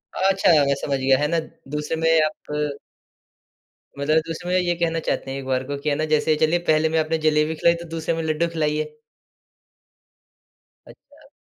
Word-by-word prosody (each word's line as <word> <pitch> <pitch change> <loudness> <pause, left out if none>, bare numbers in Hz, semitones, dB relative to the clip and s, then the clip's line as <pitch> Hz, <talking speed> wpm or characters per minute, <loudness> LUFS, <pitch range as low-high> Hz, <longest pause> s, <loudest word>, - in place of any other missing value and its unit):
अच्छा, 195 0 +2 0.2
मैं 140 - +1
समझ 140 0 -2
गया 130 0 +3
है 150 - +1
ना, 165 +2 +1 0.4
दूसरे 150 +2 -2
में 165 - +3 0.2
आप 150 -1 -4 1.2
मतलब 150 +3 +1
दूसरे 165 +2 -5
में 185 - +2
ये 175 -1 +1
कहना 165 -1 0
चाहते 135 - -2
हैं 135 - -4
एक 135 - -8
बार 130 -1 0
को 145 - -2
कि 145 +2 -2
है 145 - +1
ना 155 - -1
जैसे 155 +1 +3
चलिए 170 +3 +3
पहले 155 +1 +3
में 160 0 +1
आपने 160 +1 0
जलेबी 155 +1 +2
खिलाई, 170 +2 +3
तो 170 0 -8
दूसरे 165 0 -2
में 165 - -3
लड्डू 160 +2 0
खिलाइए? 150 0 -1 2.0
अच्छा। - - -19
155 Hz, 185 wpm, -22 LUFS, 150-165 Hz, 2.0 s, गया